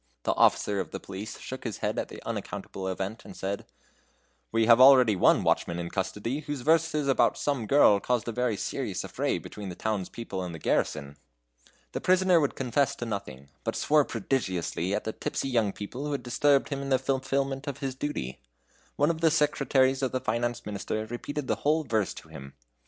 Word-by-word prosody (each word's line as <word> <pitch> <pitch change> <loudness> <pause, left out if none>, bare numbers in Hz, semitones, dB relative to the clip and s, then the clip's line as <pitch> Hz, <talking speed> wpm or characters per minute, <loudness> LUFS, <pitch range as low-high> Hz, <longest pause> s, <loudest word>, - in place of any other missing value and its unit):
The - - +1
officer 100 -1 +3
of 95 - -3
the - - -6
police 100 +3 -7
shook 130 - -7
his 110 -5 -4
head - - -1
at - - -2
the - - -10
unaccountable 95 -1 -5
event, 95 +4 -4
and - - -11
said: 100 +1 -4 0.8
"We 115 0 +3
have 115 +2 +7
already 130 -5 +8
one 90 - +4
watchman 85 - +1
in 85 0 -4
custody, 105 +7 -2
whose 145 -3 -5
verses 160 0 +2
about 135 - +3
some 135 -7 -1
girl 120 -7 +6
caused 120 +2 -1
a - - -1
very 120 -2 0
serious - - -3
affray - - -1
between 105 -2 -8
the 90 - -6
town's 105 -3 -2
people 100 -5 -5
and 90 -2 -5
the - - -6
garrison." 75 -2 -1 0.7
The - - -4
prisoner 185 -1 +4
would 145 -3 0
confess 135 +1 +1
to 120 - -5
nothing, 100 - -6
but 115 - -2
swore 150 0 +3
prodigiously 95 -6 -1
at - - -2
the 110 - -3
tipsy 135 - -3
young 115 -5 +2
people 120 +8 -6
who 145 - -2
had 140 - -3
disturbed 140 +3 +2
him 140 -1 -3
in 140 - -4
the 130 - +4
fulfilment 135 +1 -1
of 140 - -3
his 135 -2 -3
duty. 130 - -4 0.6
One 145 +3 +3
of 165 -1 -6
the 165 - +5
secretaries 140 -3 +2
of 130 - 0
the 130 - +1
Finance 120 0 -2
Minister 105 +1 -3
repeated 130 +5 -5
the - - 0
whole 155 +2 +1
verse 110 -7 0
to - - -11
him. 70 0 -10
120 Hz, 200 wpm, -28 LUFS, 100-140 Hz, 0.8 s, already